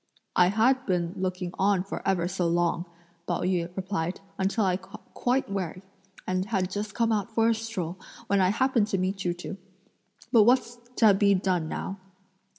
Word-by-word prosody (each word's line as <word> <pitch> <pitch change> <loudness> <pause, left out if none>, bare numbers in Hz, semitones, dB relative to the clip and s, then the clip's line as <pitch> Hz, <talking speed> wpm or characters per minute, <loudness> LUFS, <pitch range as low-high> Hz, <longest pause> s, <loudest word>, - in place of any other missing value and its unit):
"I 180 - +6
had 250 +7 +2
been 175 -2 0
looking 185 -1 -3
on 195 -1 +3
for 195 - -6
ever 175 -3 +2
so 180 -1 -1
long," 170 0 +1 0.4
Pao - - -1
yü 180 -2 0
replied, 185 -2 -2 0.2
"until 195 +3 +1
I 185 -1 +2
got 190 +1 -14
quite 255 +2 0
weary; 185 -2 -4 0.4
and 185 0 -1
had 190 -4 -1
just 205 +1 -4
come 230 -1 +2
out 215 0 0
for 225 0 +4
a - - +4
stroll, 205 -6 -4 0.3
when 200 0 +2
I 185 - +4
happened 235 0 +2
to 195 - 0
meet 190 +1 -1
you 175 -1 0
two. 180 +2 -7 0.7
But 235 -4 +7
what's 240 0 +2 0.2
to 220 -3 +6
be 200 0 +4
done 180 -4 0
now?" 195 +1 -4
190 Hz, 180 wpm, -27 LUFS, 180-215 Hz, 0.7 s, But